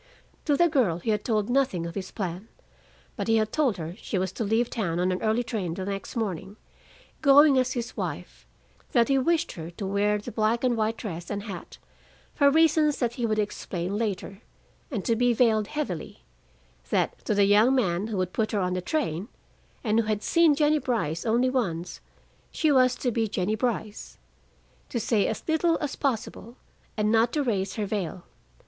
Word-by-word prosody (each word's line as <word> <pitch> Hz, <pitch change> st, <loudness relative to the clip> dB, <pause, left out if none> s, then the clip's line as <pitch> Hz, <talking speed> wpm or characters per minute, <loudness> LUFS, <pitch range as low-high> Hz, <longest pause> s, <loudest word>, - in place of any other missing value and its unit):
To 290 Hz, -2 st, +2 dB
the 345 Hz, -, +5 dB
girl 250 Hz, -, +2 dB
he 180 Hz, +6 st, -2 dB
had 210 Hz, -1 st, -1 dB
told 215 Hz, -3 st, 0 dB
nothing 245 Hz, -10 st, +1 dB
of 170 Hz, -, -5 dB
his 190 Hz, 0 st, -5 dB
plan. 185 Hz, +1 st, -5 dB, 0.7 s
But -, -, -4 dB
he 225 Hz, -, +3 dB
had 215 Hz, 0 st, 0 dB
told 275 Hz, -9 st, +1 dB
her 165 Hz, 0 st, -5 dB
she 200 Hz, -, -3 dB
was 185 Hz, -1 st, -1 dB
to 225 Hz, -, -4 dB
leave 225 Hz, +3 st, +1 dB
town 175 Hz, -9 st, -2 dB
on 180 Hz, +1 st, +1 dB
an 185 Hz, -, -2 dB
early 220 Hz, +2 st, +1 dB
train 200 Hz, -8 st, -3 dB
the 190 Hz, -, -4 dB
next 195 Hz, +3 st, -5 dB
morning, 205 Hz, -2 st, -3 dB, 0.6 s
going 285 Hz, -1 st, +7 dB
as 255 Hz, 0 st, 0 dB
his 240 Hz, -1 st, -4 dB
wife; -, -, -6 dB, 0.5 s
that 235 Hz, 0 st, +4 dB
he 270 Hz, -1 st, +4 dB
wished 335 Hz, +4 st, +1 dB
her 165 Hz, -1 st, -7 dB
to 175 Hz, +4 st, -7 dB
wear 205 Hz, +2 st, +1 dB
the 210 Hz, -, -7 dB
black 225 Hz, +3 st, 0 dB
and 250 Hz, -2 st, +2 dB
white 220 Hz, 0 st, 0 dB
dress 175 Hz, -5 st, -6 dB
and 205 Hz, -1 st, -3 dB
hat, 195 Hz, -5 st, -8 dB, 0.6 s
for 285 Hz, -1 st, +4 dB
reasons 310 Hz, -1 st, +3 dB
that 240 Hz, -2 st, -1 dB
he 240 Hz, -1 st, -2 dB
would 215 Hz, -1 st, 0 dB
explain 195 Hz, -3 st, -3 dB
later, 200 Hz, -2 st, -3 dB, 0.5 s
and 215 Hz, -9 st, -4 dB
to 230 Hz, -, +2 dB
be 245 Hz, +1 st, +3 dB
veiled 220 Hz, -3 st, +3 dB
heavily, 300 Hz, +2 st, -5 dB, 0.7 s
that -, -, 0 dB
to 215 Hz, -, 0 dB
the 200 Hz, 0 st, +4 dB
young 215 Hz, +6 st, +5 dB
man 190 Hz, -5 st, 0 dB
who 220 Hz, -3 st, -3 dB
would 185 Hz, -1 st, -2 dB
put 220 Hz, 0 st, -1 dB
her 210 Hz, -, +1 dB
on 180 Hz, -1 st, 0 dB
the 185 Hz, -, -2 dB
train, 195 Hz, -, -2 dB, 0.6 s
and 220 Hz, -2 st, +2 dB
who 230 Hz, -, +1 dB
had 215 Hz, -1 st, -1 dB
seen 335 Hz, -3 st, +4 dB
Jennie 300 Hz, +1 st, +3 dB
Brice 215 Hz, -, -2 dB
only 245 Hz, +3 st, +2 dB
once, 180 Hz, -9 st, -2 dB, 0.5 s
she 310 Hz, -3 st, +1 dB
was 255 Hz, -2 st, +4 dB
to 250 Hz, -, -1 dB
be 225 Hz, -1 st, 0 dB
Jennie 200 Hz, 0 st, -1 dB
Brice; 220 Hz, -2 st, -3 dB, 0.7 s
to 240 Hz, -, -2 dB
say 215 Hz, -2 st, +1 dB
as 220 Hz, -, -4 dB
little 320 Hz, +1 st, +2 dB
as 290 Hz, -3 st, -3 dB
possible 240 Hz, -2 st, -3 dB, 0.4 s
and 210 Hz, 0 st, +1 dB
not 225 Hz, +1 st, +3 dB
to 295 Hz, -, +1 dB
raise 200 Hz, -6 st, -1 dB
her 215 Hz, -, -2 dB
veil. 190 Hz, -3 st, -3 dB
220 Hz, 195 wpm, -26 LUFS, 195-255 Hz, 0.7 s, going